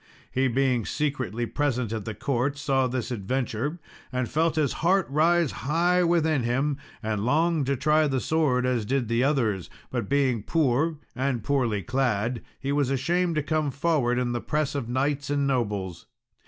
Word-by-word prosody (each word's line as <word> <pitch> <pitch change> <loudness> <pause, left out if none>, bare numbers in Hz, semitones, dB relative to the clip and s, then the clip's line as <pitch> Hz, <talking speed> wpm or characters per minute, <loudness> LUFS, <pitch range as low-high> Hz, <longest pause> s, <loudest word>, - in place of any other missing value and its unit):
He 130 +1 +2
being 130 -1 +1
secretly 130 -4 -2
present 125 -4 -1
at 110 -3 -4
the 110 - -4
court 140 +1 -1
saw 135 -2 +1
this 125 0 -3
adventure, 125 - -2 0.3
and 125 -1 -1
felt 160 +3 +1
his 150 -4 +1
heart 185 +3 +3
rise 165 +1 +3
high 175 +6 +1
within 160 -4 +2
him, 135 +5 0 0.3
and 110 -2 -1
longed 155 +3 +2
to 140 - +2
try 155 +3 +3
the 135 -2 0
sword 135 -4 +1
as 125 -3 +1
did 125 +1 -1
the 115 +2 +2
others; 115 - 0 0.2
but - - -3
being 135 -5 +2
poor 155 +3 +1 0.2
and 130 -3 -1
poorly 115 -6 0
clad, 120 -2 0 0.2
he 140 - -2
was 140 -2 +1
ashamed 170 +6 +1
to 155 - 0
come 155 0 0
forward 140 -4 +1
in 125 -1 0
the 120 -1 -2
press 150 -1 -1
of 135 -5 -3
knights 140 +3 -1
and 145 -1 +1
nobles. 105 -9 -2
135 Hz, 170 wpm, -26 LUFS, 120-150 Hz, 0.3 s, heart